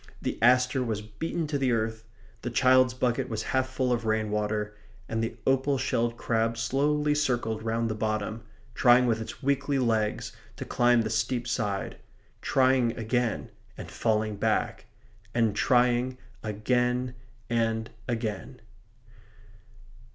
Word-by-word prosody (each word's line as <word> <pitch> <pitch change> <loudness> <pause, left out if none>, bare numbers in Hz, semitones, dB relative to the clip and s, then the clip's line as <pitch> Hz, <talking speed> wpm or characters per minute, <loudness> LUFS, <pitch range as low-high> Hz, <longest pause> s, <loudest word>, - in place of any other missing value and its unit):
The - - -3
aster 125 +2 +4
was 110 -3 -3
beaten 160 +10 -3
to 145 -1 -2
the 130 -2 +2
earth. 110 -1 -1 0.4
The 120 - -3
child's 130 +2 +4
bucket 130 0 0
was 110 -1 -3
half 130 0 +1
full 130 -1 -1
of 120 -1 -1
rainwater; 105 -1 -1 0.3
and 115 0 -1
the 115 0 -4
opal 135 +1 +2
shelled 115 -1 0
crab 115 0 0
slowly 145 +5 +1
circled 120 -7 0
round 115 +1 -1
the 110 - -1
bottom, 110 +1 -2 0.3
trying 125 0 +5
with 115 -2 +1
its 110 - -8
weakly 140 +1 +1
legs 110 -4 0 0.2
to - - -6
climb 120 -1 +3
the 110 - -3
steep 115 +2 -1
side; 100 -4 -2 0.4
trying 130 -3 +2
again 115 0 -1 0.3
and - - -8
falling 110 -2 0
back, - - -1 0.5
and 115 -4 +2
trying 125 +2 +2 0.3
again 125 +4 0 0.3
and 115 -1 0 0.2
again. 115 -4 -3
120 Hz, 135 wpm, -28 LUFS, 110-130 Hz, 0.5 s, trying